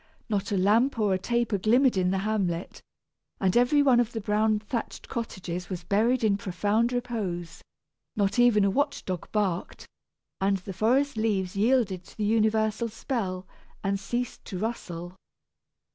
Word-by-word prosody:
Not 205 -2 -1
a 200 - +1
lamp 225 +8 +3
or 210 -3 +2
a 185 - 0
taper 235 -1 0
glimmered 245 +5 +4
in 185 -1 +2
the 190 - +1
hamlet, 190 -5 -2 0.6
and 190 -2 +1
every 250 +4 +4
one 260 -4 +5
of 240 -1 0
the 225 - -2
brown 215 +1 +1
thatched 215 +3 -5
cottages 180 -6 -5
was 180 -3 -5
buried 225 +7 +2
in 205 -2 +3
profound 205 +5 0
repose. 205 -9 -3 0.5
Not 205 +3 +1
even 230 -4 +5
a 200 - +2
watch 285 +5 -1
dog 185 -3 -5
barked; 195 -5 -2 0.5
and 195 0 +2
the 190 +1 -8
forest 250 +7 +1
leaves 200 -4 0
yielded 210 -4 +2
to - - -17
the 210 - -1
universal 220 +1 +1
spell, 200 -6 -3 0.4
and 195 0 0
ceased 240 +4 -4
to 190 - -5
rustle. 180 -4 -5
210 Hz, 160 wpm, -27 LUFS, 190-235 Hz, 0.6 s, one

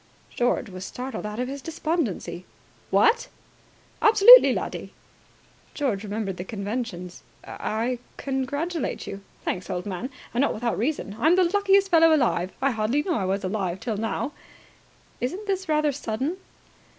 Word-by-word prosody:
George 245 0 0
was 185 -1 -8
startled 250 0 -5
out 210 +2 -6
of 250 - -1
his 275 +1 -6
despondency. 265 - -3 0.5
"What!" 465 +1 +3 0.7
"Absolutely, 445 +3 +9
laddie!" - - -4 0.8
George 235 -9 -1
remembered 205 -2 -3
the 180 - -4
conventions. 200 -3 -5 0.2
"I 235 +3 -2 0.2
congratulate 285 +6 -2
you." 200 0 -7 0.2
"Thanks, 180 - -3
old 180 -1 -3
man. 205 +5 -4 0.2
And 240 - +1
not 280 - +1
without 235 +1 -1
reason. 235 -5 -2
I'm 320 +8 +4
the 370 - +4
luckiest 390 +1 +3
fellow 325 -1 +6
alive. 190 - +1
I 275 - +3
hardly 230 +6 0
knew 355 - -1
I 200 -11 -1
was 195 +2 -1
alive 185 -2 -2
till 220 -1 -3
now." 225 +6 -2 0.9
"Isn't 360 +12 -3
this 380 -3 -2
rather 305 -1 +2
sudden?" 270 +5 -3
250 Hz, 145 wpm, -25 LUFS, 205-315 Hz, 0.9 s, Absolutely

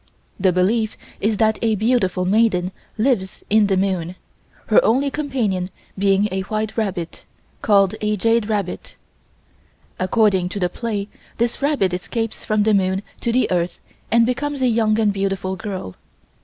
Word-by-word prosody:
The 190 -1 +3
belief 215 +5 +1 0.2
is 215 +1 0
that 220 0 +2
a 225 -2 +2
beautiful 200 -5 +1
maiden 190 -3 +2 0.3
lives 215 -5 0
in 215 -1 +5
the 195 -1 +1
moon, 185 -2 -1 0.5
her - - +4
only 275 +4 +2
companion 235 -12 -1 0.3
being 195 +1 +2
a 190 0 -1
white 215 +2 -3
rabbit, 190 -7 -3 0.4
called 200 -2 +4
a 210 0 0
Jade 225 +1 +1
Rabbit. 200 -4 -3 1.0
According 190 -2 +2
to 200 - -5
the 180 -2 +1
play 210 -3 -3 0.3
this 235 +3 -1
rabbit 275 - +1
escapes 225 +5 -3
from 215 -1 +1
the 215 0 +3
moon 190 0 +1 0.2
to 235 - -1
the 255 +2 +2
Earth 175 -1 -1 0.3
and 230 +1 +4
becomes 275 +3 -2
a - - +4
young 220 -2 +2
and 210 -2 +2
beautiful 195 -1 -2
girl. 190 - -6
210 Hz, 155 wpm, -21 LUFS, 190-230 Hz, 1.0 s, in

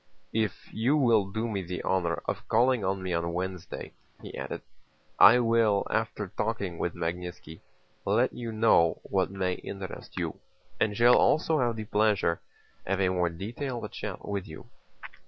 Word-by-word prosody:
"If 110 -3 -2
you 125 +7 +2
will 115 -8 +4
do 110 +4 -2
me 100 -4 -2
the 90 0 -5
honor 85 -3 0
of - - -4
calling 120 0 +3
on 95 0 -1
me 90 -1 -2
on 85 0 -1
Wednesday," 90 0 -5 0.3
he - - -9
added, - - -5 0.6
"I 115 +5 +9
will, 115 -4 +3
after 110 -3 -1
talking 100 -6 -2
with 85 - -2
Magnítski, 85 -1 -5 0.4
let 115 +6 +2
you 115 -2 -5
know 110 -7 +4
what 95 -2 0
may 95 -1 -1
interest 95 +1 -8
you, - - -3 0.4
and 105 -1 +1
shall 120 +1 +7
also 155 0 +3
have 120 -2 +1
the 110 -1 -5
pleasure 105 -5 +2 0.4
of 95 +1 -1
a 95 -1 +3
more 90 -2 +1
detailed 120 - -5
chat - - -6
with 100 -2 -3
you." 80 - -11
100 Hz, 160 wpm, -28 LUFS, 90-115 Hz, 0.6 s, I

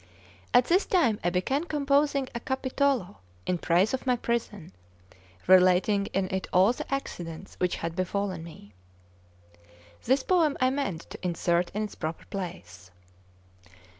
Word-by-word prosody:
At 245 - +5
this 365 +4 +2
time 245 - +2
I 175 - +2
began 265 - -1
composing 285 -2 +1
a 235 - -3
Capitolo 265 -5 -1 0.3
in 180 -1 -1
praise 180 +8 +2
of 265 0 -3
my 250 - +4
prison, 230 - -3 0.7
relating 185 +2 +4
in 190 0 -1
it 190 - -2
all 190 +6 +5
the - - -8
accidents 175 -10 -5
which 180 -1 +1
had 165 0 -4
befallen 185 -1 -2
me. 155 -11 -13 1.3
This 260 +2 +2
poem 330 -6 +2
I 255 0 +3
mean 270 - -2
to 170 - -12
insert 175 0 0
in 215 - 0
its 210 - -5
proper 160 0 -5
place. 95 - -7
200 Hz, 140 wpm, -27 LUFS, 175-265 Hz, 1.3 s, At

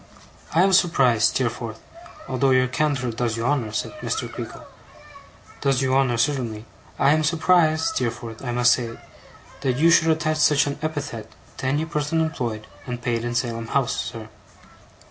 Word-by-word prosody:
'I 170 - +5
am 195 0 +3
surprised, 135 - +3
Steerforth 115 -3 -2 0.5
although 135 +1 +1
your 130 -1 +4
candour 135 -2 0
does 115 -1 -2
you 115 - -2
honour,' 125 -6 0
said - - -3
Mr. - - -2
Creakle, - - -8 1.0
'does 135 -2 +1
you 130 0 +1
honour, 130 -3 +2
certainly 120 -4 -1 0.3
I 140 - +4
am 155 +1 +2
surprised, 160 0 +2
Steerforth, 115 -2 -4
I 120 - -3
must 120 0 +4
say, 115 -2 -4 0.6
that 130 -2 0
you 165 +3 +5
should 165 -1 +5
attach 155 -1 +1
such 145 -2 +4
an 140 -1 -4
epithet 145 -8 -4 0.3
to 130 - -3
any 145 +4 0
person 150 0 -1
employed 120 -9 -2 0.2
and 125 -1 -4
paid 120 -2 -1
in 120 0 -3
Salem 115 -2 -2
House, 135 +1 0
sir. 110 -2 -5
130 Hz, 165 wpm, -23 LUFS, 120-150 Hz, 1.0 s, I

